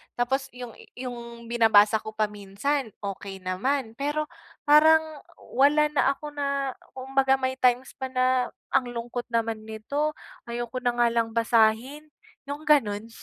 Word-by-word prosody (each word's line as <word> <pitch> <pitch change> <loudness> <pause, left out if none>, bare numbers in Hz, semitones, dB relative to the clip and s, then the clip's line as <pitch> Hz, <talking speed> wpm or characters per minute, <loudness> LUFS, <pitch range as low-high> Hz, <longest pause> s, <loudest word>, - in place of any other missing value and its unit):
Tapos, 265 +2 0
yung 245 -1 -7 0.2
yung 235 -2 -8
binabasa 220 -2 +5
ko 215 0 -9
pa 215 -1 +1
minsan, 215 +7 -2
okey 195 -1 -6
naman. 225 +6 -1
Pero 295 +2 -1 0.4
parang 315 +2 +6 0.6
wala 300 +2 +4
na 285 -1 +2
ako 295 +1 -8
na 280 -2 -1 0.2
kumbaga, 265 0 +2
may 260 0 -2
times 250 +1 +2
pa 265 - -3
na, 255 -1 +1 0.2
"Ang 260 -2 +2
lungkot 240 +1 -4
naman 225 -2 -2
nito. 280 +8 -2 0.3
Ayoko 240 +1 -4
na 245 -1 0
nga 240 0 +3
lang 230 -1 -1
basahin." 230 +6 +2 0.4
Yung 290 +2 -5
ganun? 225 -8 +2
245 Hz, 140 wpm, -26 LUFS, 225-275 Hz, 0.6 s, parang